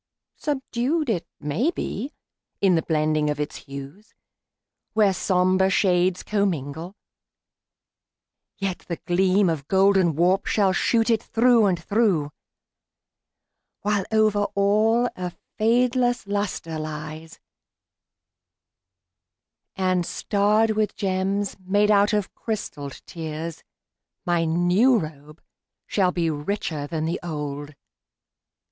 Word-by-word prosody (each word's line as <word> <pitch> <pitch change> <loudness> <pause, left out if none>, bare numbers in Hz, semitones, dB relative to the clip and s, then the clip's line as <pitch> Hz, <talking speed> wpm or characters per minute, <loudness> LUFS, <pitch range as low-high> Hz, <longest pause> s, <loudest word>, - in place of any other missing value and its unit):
Subdued, 275 0 -1
It 170 -5 -2
may 160 - 0
be, 275 - -4 0.5
in 195 -2 +4
the 165 - +3
blending 155 -1 +1
of 150 0 -2
its 150 0 -3
hues, 140 +9 -10 0.8
Where 210 -3 +4
somber 185 +1 +2
shades 185 -1 +2
commingle, 175 -4 -2 1.6
yet 195 -2 -2
the 170 - -2
gleam 185 +3 +2
Of 155 -4 -2
golden 190 -4 +3
warp 180 +4 +2
shall 195 -3 +2
shoot 225 +4 +2
it 225 - +2
through 230 -2 +3
and 185 -2 +1
through, 195 -9 +1 1.5
While 205 -2 0
over 215 -2 +3
all 215 +4 +3
a 180 -1 -5 0.3
fadeless 245 +2 +2
luster 200 -5 -3
lies, 155 +1 -7 2.4
And 185 -2 +1
starred 210 +4 +1
with 215 -1 0
gems 195 +1 -1
made 205 +3 +2
out 205 +1 +4
of 210 -3 -1
crystalled 145 - -5
tears, 160 0 -6 0.6
My 175 -1 +1
new 175 +10 +3
robe 150 -3 -7 0.4
shall 185 -3 +1
be 170 -2 0
richer 150 -1 -3
than 160 0 -2
the 170 +2 -2
old. 145 -3 -5
190 Hz, 105 wpm, -24 LUFS, 160-210 Hz, 2.4 s, in